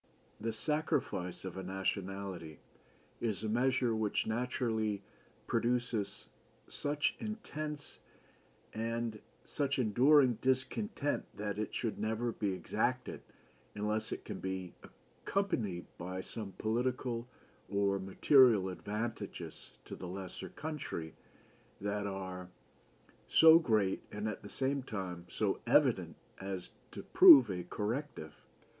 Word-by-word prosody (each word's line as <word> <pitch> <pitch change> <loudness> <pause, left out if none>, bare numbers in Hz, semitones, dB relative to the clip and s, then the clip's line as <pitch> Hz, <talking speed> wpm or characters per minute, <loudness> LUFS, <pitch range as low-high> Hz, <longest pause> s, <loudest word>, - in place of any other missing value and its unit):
The 115 +2 -2
sacrifice 110 - -1
of 95 0 -6
a - - -3
nationality 95 -3 -3 0.6
is 110 -4 -1
a - - -1
measure 125 +1 +2
which 110 -2 0
naturally 110 -3 -1 0.4
produces 115 -4 0 0.4
such 145 +1 0
intense 155 -9 -5 0.7
and 115 0 -2 0.3
such 140 -1 -1
enduring 125 +1 +5
discontent 130 - 0
that 105 0 -3
it 110 +1 -2
never 115 +2 -1
should - - -16
be 100 -2 +1
exacted 90 -2 -1 0.5
unless 105 +1 -1
it - - -5
can - - -5
be 95 -1 -4 0.5
accompanied 115 - -1
by 90 +2 -4
some 100 -1 -3
political 120 +1 -1 0.4
or 100 -1 +1
material 105 +1 +5
advantages 105 +5 -5
to - - -7
the 90 - -7
lesser 95 0 -6
country 145 - -5 0.7
that 100 0 -2
are 95 -2 -5 0.8
so 160 0 +8
great 110 - +1
and 105 +1 -3
at 105 - -4
the 100 - -10
same 135 +1 +1
time 95 -8 -5
so - - 0
evident - - +3 0.2
as 95 -2 -5 0.2
to - - -7
prove 125 -7 +9
a 90 -1 -3
corrective. 105 - -4
110 Hz, 115 wpm, -34 LUFS, 95-125 Hz, 0.8 s, prove